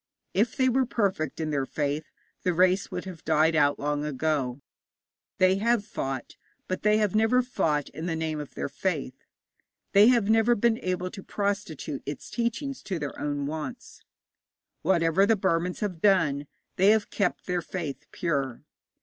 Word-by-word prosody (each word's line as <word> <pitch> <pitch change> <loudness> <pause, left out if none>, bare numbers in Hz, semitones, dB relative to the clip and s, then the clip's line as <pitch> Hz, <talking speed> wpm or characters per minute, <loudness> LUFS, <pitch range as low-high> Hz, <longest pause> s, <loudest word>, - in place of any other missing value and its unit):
If 220 +4 +1
they 260 - +3
were 260 0 +2
perfect 190 - -1
in 155 -1 -2
their 140 -2 0
faith, 150 +1 -2 0.4
the 180 -2 0
race 185 +2 +3
would - - -5
have 180 -4 -9
died 160 +1 +3
out 145 -1 +3
long 145 0 -1
ago. 145 -3 -1 0.8
They 185 +1 +4
have 225 0 +1
fought, 135 - -5 0.3
but 185 - -2
they 210 0 +4
have 210 -3 +1
never 225 +4 +3
fought 150 - 0
in 160 +4 -6
the 165 - -1
name 160 -1 -2
of 150 - -8
their - - -2
faith. 145 -4 -2 0.8
They 205 +2 +7
have 240 -5 +4
never 225 +2 +4
been 230 +1 +2
able 185 0 -2
to 195 - -8
prostitute 200 -9 -3
its 145 -1 -6
teachings 240 +4 -2
to 190 - -3
their 150 -3 -4
own 145 -1 -2
wants. 160 - -6 0.8
Whatever 175 +1 +3
the 225 - +4
Burmans 180 -2 0
have 185 -6 -3
done, 150 -8 +3 0.3
they 190 +2 +5
have 220 -1 +3
kept 200 -4 -1
their 180 -1 -1
faith 165 -5 -5
pure. 140 - -2
180 Hz, 165 wpm, -27 LUFS, 150-210 Hz, 0.8 s, They